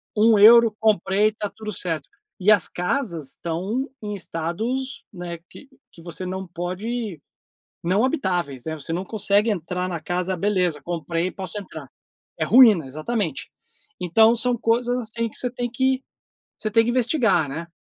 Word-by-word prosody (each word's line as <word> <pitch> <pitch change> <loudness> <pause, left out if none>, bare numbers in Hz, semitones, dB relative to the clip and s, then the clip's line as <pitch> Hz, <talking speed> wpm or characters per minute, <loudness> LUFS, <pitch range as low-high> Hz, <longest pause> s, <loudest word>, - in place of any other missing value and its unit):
1€, 225 +1 +7
comprei, 210 0 +2
tá 210 -1 -5
tudo 215 -1 -6
certo". 165 -7 -3 0.3
E 205 +3 +4
as 210 - +4
casas 180 - -2
estão 195 - -3
em 210 -1 -4
estados, 210 +10 -3
né, 175 -2 -6
que 280 - -14 0.2
que 170 - -15
você 175 +2 -6
não 190 +1 -4
pode 185 +2 -4 0.6
não 190 +7 +2
habitáveis, 175 - -2
né. 160 - -3
Você 155 +1 -7
não 185 +3 -3
consegue 210 +1 +1
entrar 180 -1 -2
na 170 -3 -4
casa: 180 +3 -2
"Beleza, 180 -5 0
comprei 170 0 -2
e - - -4
posso 190 +2 -6
entrar". 195 - -10 0.5
É - - 0
ruína, 225 - +7
exatamente. 155 - -3 0.5
Então 220 +6 +5
são 240 +1 +1
coisas 240 +2 +1
assim 230 0 -2
que - - -8
você 250 - -1
tem 245 0 -3
que, 260 +2 0 0.5
você 215 -1 -3
tem 225 +1 +5
que 235 - -1
investigar, 230 - +2
né. 165 +4 -6
200 Hz, 160 wpm, -23 LUFS, 175-230 Hz, 0.6 s, 1€